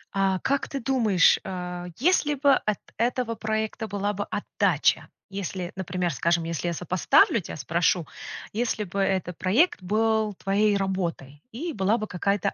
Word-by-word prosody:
А 195 -1 +2
как 275 +6 0
ты 275 - -3
думаешь, 230 -8 +4
а, 180 -1 -5
если 295 0 +2
бы 280 0 +4
от 215 -5 0 0.2
этого 240 0 0
проекта 220 0 -2
была 205 0 -2
бы 205 0 -3
отдача, - - +1 0.2
если, 190 -2 -4
например, 180 -2 -2
скажем, 170 +6 +1
если 165 +1 -3
я 170 - 0
сопоставлю, 180 +5 +3
тя - - -7
спрошу. 170 +4 +1 0.5
Если 225 -1 -1
бы 200 0 -5
это 190 -2 0
проект 200 - +2
был 215 +2 +1
твоей 200 +2 +2
работой, 175 -8 -3
и 320 +8 -4
была 205 0 +2
бы 215 - -3
какая-то 200 0 -1
195 Hz, 155 wpm, -26 LUFS, 180-220 Hz, 0.5 s, думаешь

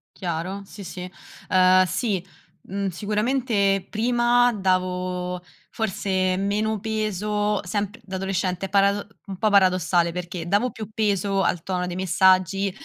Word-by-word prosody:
Chiaro. 180 +2 -4
Sì, 200 +1 -10
sì, 180 0 -7 0.4
ehm, 185 -1 +5
sì, 185 +1 -1 0.4
mhmm, 195 +1 -2
sicuramente 210 0 0
prima 240 +2 +3
davo 180 -2 -1 0.3
forse 190 -3 -1
meno 210 +2 0
peso, 210 -1 -1
sempr 205 +3 -3
da 190 -2 -7
adolescente 190 0 -2
parado 200 +1 +2 0.2
un 195 -1 -7
po' 215 +2 +2
paradossale, 185 -3 +3
perché 175 -1 -5
davo 205 +7 +2
più 215 -4 -8
peso 200 -2 +1
al 175 -3 0
tono 180 -1 -2
dei 175 - -5
messaggi 190 +2 +3
195 Hz, 125 wpm, -24 LUFS, 185-210 Hz, 0.4 s, ehm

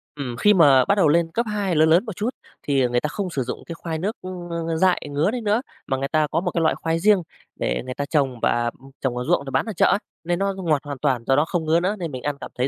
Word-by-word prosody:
Ừm, 130 -5 -5
khi 210 - +5
mà 140 -8 +6
bắt 200 - +3
đầu 190 -6 +4
lên 165 +2 +2
cấp 235 +7 0
2, 200 -4 -1
lớn 155 +1 +4
lớn 170 +7 +4
một 215 -5 -6
chút 215 +6 -1 0.3
thì, 140 -2 +1
ờ, 125 - +2
người 120 0 +2
ta - - -1
không 185 +5 -3
sử 140 -6 -2
dụng 125 - -6
cái 170 - -7
khoai 165 -1 -4
nước, 200 +6 -2
ưm, 180 -1 -7
ng 170 -1 -3
ng 165 -1 -1
dại 185 +1 +3
ngứa 145 +8 +1
đấy 245 0 -3
nữa, 215 +2 +1 0.3
mà 135 - 0
người 135 +1 -2
ta 155 0 +1
có 165 - +1
một 180 0 -2
cái 170 - -1
loại 160 - +2
khoai 165 0 -1
riêng 205 +1 +4 0.3
để - - -1
người 130 - -4
ta 145 - -3
trồng 140 -5 0
và, 120 0 +1
ừm, 135 +1 -15
trồng 125 -2 -1
ở 125 - -2
ruộng 170 -4 +2
để - - -5
bán - - +1
ở 220 - -4
chợ - - +3
á, - - +3 0.3
nên 175 +1 -1
nó 195 0 0
ngọt 165 -7 0
hoàn 145 -2 -6
toàn, 130 -5 0
do 135 - +4
đó 150 +3 +3
không 170 -1 -2
ngứa 160 +2 +3
nữa 190 +4 0
nên 170 -4 -4
mình 130 -2 -6
ăn 145 -1 -1
cảm - - -7
thấy 125 +1 +1
165 Hz, 315 wpm, -23 LUFS, 140-185 Hz, 0.3 s, mà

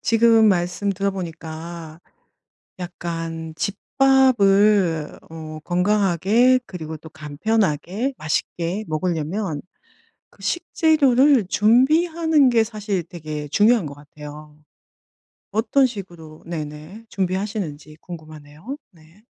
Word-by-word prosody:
지금 225 -1 +5
말씀 180 +2 0
들어보니까 170 -4 -5 0.8
약간 165 -2 -5
집밥을 205 - +3
어 155 -1 -8
건강하게 205 +6 +3
그리고 160 -3 -7
또 160 +1 -13
간편하게 185 - -1
맛있게 170 +5 -2
먹으려면 160 +1 -2 0.7
그 - - -19
식재료를 290 - +3
준비하는 300 - +3
게 230 -2 +4
사실 210 -4 -3
되게 155 -3 -7
중요한 210 +5 +3
것 140 - -9
같아요. 150 +1 -12 1.0
어떤 245 +6 +3
식으로 175 -9 -8
네네. 155 +5 -7
준비하시는지 185 -5 -3
궁금하네요. 155 - -10
네. 170 +5 -22
180 Hz, 230 characters per minute, -22 LUFS, 160-220 Hz, 1.0 s, 지금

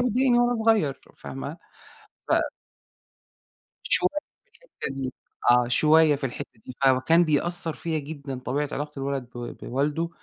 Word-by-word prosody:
بتضايقني 250 +1 +3
وأنا 240 0 +3
صغير 220 - +2
ف - - -22
فاهمة؟ 140 +4 -6 0.7
ف - - +1 1.5
شوي - - +4 0.4
في 485 - -41
الحتّة 475 - -8
دي 130 -2 -4 0.4
آه. 120 0 +4
شوية 155 +3 +5
في 135 - -4
الحتّة 120 -3 -7
دي. 130 - -9
فكان 135 +6 +4
بيأثّر 165 +1 +1
فيّا 160 -2 -2
جدًا 140 -3 -7
طبيعة 140 +3 -2
علاقة 150 +1 -4
الولد 135 -3 -3
بو 120 0 -6
بوالده. 150 +6 -2
150 Hz, 140 wpm, -25 LUFS, 135-170 Hz, 1.5 s, شوية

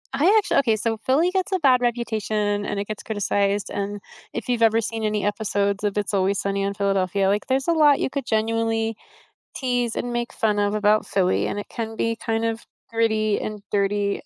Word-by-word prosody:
I 280 +4 +1
actually 420 - +2
okay, 230 -5 +2
so 225 +1 -1
Philly 310 +7 +3
gets 380 +1 -1
a 375 - +2
bad 260 -5 +4
reputation 215 -4 -1
and 200 - -2
it 200 - -3
gets 215 -1 -5
criticized 200 -1 0
and 205 0 -4 0.3
if 235 +1 -5
you've 240 -2 0
ever 225 0 +4
seen 225 0 -4
any 210 -1 0
episodes 200 -1 -1
of 205 0 -1
It's 205 0 -1
Always 195 0 +1
Sunny 195 0 -1
in 200 0 -1
Philadelphia, 195 -1 +1
like 205 +1 0
there's 265 0 0
a - - +4
lot 300 -4 +5
you - - 0
could 275 -1 -4
genuinely 225 0 0 0.6
tease 245 -3 -1
and 245 - -3
make 240 0 -2
fun 210 -2 +1
of 205 0 +1
about 210 0 +2
Philly, 185 -2 +1
and - - -3
it 205 - -6
can 225 -1 -5
be 230 0 0
kind 225 0 -2
of 225 0 -1 0.3
gritty 220 -2 +1
and 215 -1 -5
dirty 200 0 0
215 Hz, 205 wpm, -23 LUFS, 205-235 Hz, 0.6 s, lot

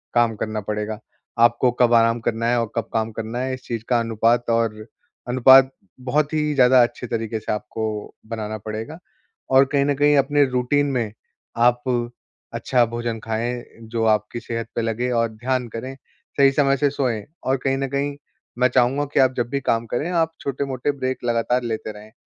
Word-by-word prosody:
काम 120 -2 +3
करना 110 -1 -3
पड़ेगा। 105 +1 -4 0.4
आपको 120 +2 +4
कब 120 -1 +5
आराम 115 0 +4
करना 115 0 -1
है, 120 0 +2
और 115 - -4
कब 115 - -2
काम 110 0 0
करना 115 +2 -5
है? 130 +1 -2
इस 130 -1 -7
चीज़ 115 -2 -4
का 120 -2 +3
अनुपात 115 +1 +1
और 115 -2 0 0.4
अनुपात 130 +2 +7 0.3
बहुत 145 +4 0
ही 150 -1 0
ज़्यादा 130 -1 +6
अच्छे 120 +1 -4
तरीके 115 -1 -3
से 110 - -4
आपको 105 0 -4
बनाना 110 -1 -4
पड़ेगा 110 +8 -6 0.6
और 135 +1 +7
कहीं 140 -1 +3
न 145 - +2
कहीं 145 +1 +4
अपने 145 +1 +3
रूटीन 125 +3 +1
में, 115 -5 -2 0.4
आप 120 +1 +3 0.7
अच्छा 125 -2 +2
भोजन 115 0 -4
खाएँ 115 +3 -3 0.2
जो 115 0 -3
आपकी 110 +1 +1
सेहत 115 -1 -5
पे - - 0
लगे 115 +2 -1
और 115 -1 +1
ध्यान 125 +3 -2
करें, 130 +4 -5 0.4
सही 140 -1 +6
समय 140 -1 +2
से 145 +2 +2
सोएँ। 125 -6 -1 0.2
और 135 +1 +1
कहीं 135 0 +2
न 135 0 -1
कहीं 140 +1 -2 0.4
मैं 125 - +5
चाहूँगा 130 +3 +2
कि - - +3
आप 130 -1 +4
जब 120 - 0
भी 140 - -1
काम 115 -1 0
करें, 145 +9 -2
आप 165 -2 +1
छोटे-मोटे 135 0 -2
ब्रेक 130 -2 -3
लगातार 120 +1 +1
लेते 110 -2 -3
रहें। 105 +1 -13
120 Hz, 185 wpm, -22 LUFS, 115-130 Hz, 0.7 s, अनुपात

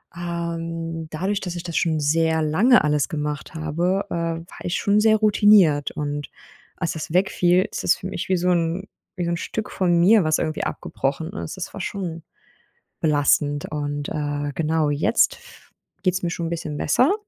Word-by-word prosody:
Ähm, 165 -1 -4
dadurch, 190 +6 -2
dass 180 -2 -4
ich 175 - -5
das 170 -2 -6
schon 160 -2 +1
sehr 160 +2 +2
lange 195 +12 +4
alles 150 +1 +1
gemacht 150 -3 -4
habe, 170 +5 -1
äh, - - -4
war 165 0 -4
ich 175 - -2
schon 205 +1 +2
sehr 220 0 +5
routiniert. 205 -8 +4
Und 145 -1 -4 0.5
als 165 -3 -2
das 160 -1 -6
wegfiel, 180 -1 +3
ist - - -4
es - - +4
für 185 - -7
mich 185 - -5
wie 185 - +3
so 180 +1 +1
‘n 170 +3 0 0.3
wie 180 -2 -2
so 170 - -1
‘n 170 - -1
Stück 215 +5 -4
von 175 -2 +2
mir, 200 +4 +6
was 155 0 +2
irgendwie 155 -1 -2
abgebrochen 145 +6 -3
ist. 195 - -6
Das 185 - -6
war 200 - -6
schon 175 -4 -4 0.8
belastend 145 -1 +2
und, 145 -1 -3
äh, 145 -1 -2
genau 160 -1 +1
jetzt 145 +10 +2
f 485 0 -18 0.3
geht's 185 0 0
mir 175 - 0
schon 170 0 -3
‘n - - -4
bisschen 155 -3 -4
besser, 255 - +3
165 Hz, 185 wpm, -23 LUFS, 155-185 Hz, 0.8 s, mir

